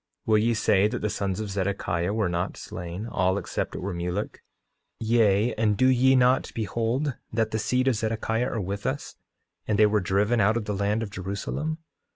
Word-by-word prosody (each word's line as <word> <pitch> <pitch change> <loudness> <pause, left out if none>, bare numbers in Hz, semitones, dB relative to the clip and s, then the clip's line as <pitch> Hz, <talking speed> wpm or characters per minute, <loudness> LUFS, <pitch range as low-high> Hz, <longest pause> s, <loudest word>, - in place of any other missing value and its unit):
Will 110 -1 +4
ye 115 +2 +2
say 105 -2 +3
that 120 +1 -4
the 105 - 0
sons 95 -1 -2
of 105 -2 -4
Zedekiah 95 -2 -1
were 110 -2 0
not 85 +1 -2
slain, 90 +4 -6
all 95 -4 +1
except - - -3
it - - -5
were 95 +1 -3
Mulek? 90 +4 -3 0.6
Yea, 110 -1 +3
and 110 -2 +1
do 130 - +3
ye 130 +1 +5
not 130 +1 +3
behold 115 +5 -1 0.2
that 110 0 0
the 110 - -1
seed 125 +4 +1
of 130 - +4
Zedekiah 115 +2 -1
are 115 - -1
with 100 +2 -3
us, - - -4 0.5
and 105 - +1
they 110 - +6
were 105 0 +2
driven 105 +5 +2
out 110 +3 +3
of 110 - -3
the 105 - -2
land 105 +3 0
of 105 - -6
Jerusalem? 100 - -3
105 Hz, 195 wpm, -26 LUFS, 100-115 Hz, 0.6 s, they